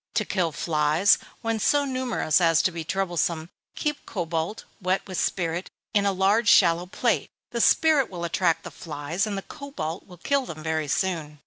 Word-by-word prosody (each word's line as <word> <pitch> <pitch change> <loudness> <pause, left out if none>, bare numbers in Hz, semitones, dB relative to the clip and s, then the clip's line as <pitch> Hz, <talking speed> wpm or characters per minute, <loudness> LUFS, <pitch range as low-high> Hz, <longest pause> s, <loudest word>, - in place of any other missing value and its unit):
To 215 - +1
kill 180 -5 0
flies, 155 +5 +3 0.2
when 225 -1 0
so 285 +6 +3
numerous 255 - 0
as 165 -2 +4
to 185 - +2
be 165 -1 -5
troublesome, 170 -2 -1 0.2
keep 295 -1 -2
cobalt, 170 +1 -3 0.2
wet 185 +1 0
with 185 -2 -3
spirit, 175 0 -1 0.2
in 200 -1 +3
a - - +3
large 200 +4 +3
shallow 175 -1 +5
plate. 235 +5 0 0.2
The 235 - -1
spirit 305 -2 +4
will 175 -2 -6
attract 170 0 +1
the - - -8
flies, 160 +5 -3
and 205 -2 -3
the 195 - -4
cobalt 275 - -6
will 180 -2 -13
kill 275 +8 0
them 155 -1 -8
very 160 -1 -1
soon. 155 -2 -2
180 Hz, 180 wpm, -25 LUFS, 165-215 Hz, 0.2 s, shallow